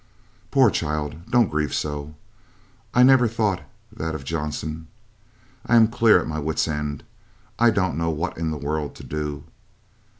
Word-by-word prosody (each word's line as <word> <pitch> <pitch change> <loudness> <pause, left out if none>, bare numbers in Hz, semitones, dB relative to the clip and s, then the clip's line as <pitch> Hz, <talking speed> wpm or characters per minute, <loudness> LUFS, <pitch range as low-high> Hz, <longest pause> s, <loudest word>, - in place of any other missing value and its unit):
"Poor 130 -6 +5
child, 75 +1 -3
don't 120 -4 +3
grieve 75 -2 -1
so. 75 0 -4 0.8
I 125 - +5
never 130 -2 +6
thought 105 -5 0 0.3
that 80 0 -4
of 75 - -6
Johnson. 80 +1 -4 0.8
I 120 - +2
am 110 -1 +6
clear 115 -4 +5
at - - -4
my 80 0 -3
wit's 75 +2 -1
end. 75 -2 -3 0.6
I 120 0 +6
don't 95 -7 0
know 85 0 0
what 80 +3 -2
in 80 -1 -2
the 80 - -3
world 75 +1 -3
to - - -11
do. 75 -2 -4
80 Hz, 160 wpm, -23 LUFS, 75-105 Hz, 0.8 s, never